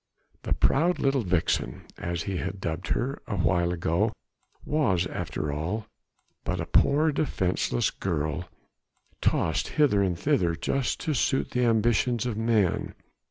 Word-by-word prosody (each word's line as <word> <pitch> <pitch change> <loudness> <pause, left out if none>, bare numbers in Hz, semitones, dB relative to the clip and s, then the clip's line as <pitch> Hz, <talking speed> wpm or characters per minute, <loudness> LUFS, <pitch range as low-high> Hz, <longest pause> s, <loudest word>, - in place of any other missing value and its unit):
The - - -1
proud 170 +6 +3
little 135 -1 +2
vixen, 85 - 0 0.2
as 85 -1 -2
he 95 +1 -3
had 95 +3 -4
dubbed 85 0 -3
her 135 +4 -1
a 100 - -2
while 85 0 +2
ago, 90 +5 0 0.5
was 115 - +2
after 75 -4 -3
all 90 +9 -3 0.6
but - - -2
a - - -2
poor 155 +3 +3
defenceless 95 - 0
girl 80 -1 -2 0.7
tossed - - +1
hither 135 -10 +4
and 90 -3 0
thither 90 - +1
just 135 +8 -1
to 155 - -1
suit 135 0 +1
the 125 0 +1
ambitions 115 +1 +2
of 120 -3 -1
men. 110 -4 +1
100 Hz, 140 wpm, -27 LUFS, 85-125 Hz, 0.7 s, hither